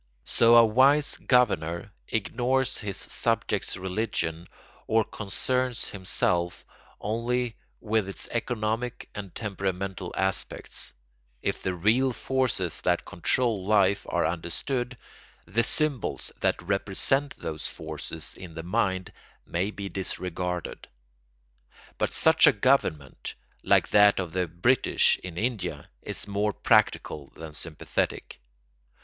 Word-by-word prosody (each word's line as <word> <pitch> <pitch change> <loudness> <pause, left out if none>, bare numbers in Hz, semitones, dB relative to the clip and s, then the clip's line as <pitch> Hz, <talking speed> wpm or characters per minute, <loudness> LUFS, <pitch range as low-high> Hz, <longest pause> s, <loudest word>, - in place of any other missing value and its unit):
So 115 0 +5
a 115 -1 +9
wise 135 +6 +4
governor 100 -8 +2 0.2
ignores 125 +4 0
his 105 -4 -3
subjects' - - 0
religion 95 -3 -2 0.4
or 110 0 +4
concerns 125 +5 -2
himself 90 -2 0 0.3
only 120 +2 -1 0.2
with 110 -2 0
its 95 - -5
economic 115 0 -2
and 100 -3 -7
temperamental 95 -3 -3
aspects; 95 0 -2 0.5
if - - -1
the 95 -1 -1
real 120 +9 +3
forces 125 - -1
that - - +1
control 110 +3 0
life 100 -2 +3
are - - +1
understood, 120 - -2 0.5
the 110 +7 +1
symbols 145 -1 -2
that - - +1
represent 100 +9 0
those 80 -1 -4
forces 80 0 -4
in 90 -3 -10
the 80 - -5
mind 95 -1 0 0.3
may 90 +4 -1
be 100 -2 -6
disregarded. 90 -2 -3 1.1
But - - +1
such - - +6
a - - +9
government, 70 -4 0 0.3
like - - +3
that 105 -1 +6
of 90 -4 -3
the 90 -1 0
British 90 +11 +3
in 90 -2 -8
India, 115 0 -2
is - - -2
more 100 +1 0
practical 70 -5 +2
than 80 -1 -8
sympathetic. 80 0 -3
100 Hz, 115 wpm, -27 LUFS, 90-120 Hz, 1.1 s, a